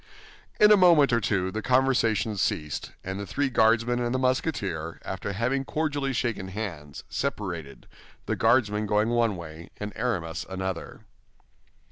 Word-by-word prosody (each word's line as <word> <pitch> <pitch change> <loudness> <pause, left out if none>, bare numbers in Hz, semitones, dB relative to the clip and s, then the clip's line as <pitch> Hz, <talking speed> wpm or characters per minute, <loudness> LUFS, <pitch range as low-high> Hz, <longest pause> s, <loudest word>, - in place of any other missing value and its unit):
In 210 0 +7
a 210 - +8
moment 165 -8 +5
or 115 - +3
two 95 -2 0
the 110 - -3
conversation 125 -4 +2
ceased, 75 -6 -2
and 95 +1 -4
the 100 - -5
three 140 +5 0
Guardsmen 115 +1 +3
and 120 +1 -1
the - - +2
Musketeer, 115 - -1
after - - -4
having 125 +6 0
cordially 145 -2 -1
shaken 115 -6 -2
hands, 90 -8 -6
separated, 85 - -4 0.4
the - - -1
Guardsmen 110 -3 +2
going 105 +2 +2
one 120 -3 +2
way 85 0 -9
and 105 0 -5
Aramis 90 -10 -2
another. 95 -2 -5
110 Hz, 145 wpm, -26 LUFS, 95-130 Hz, 0.4 s, a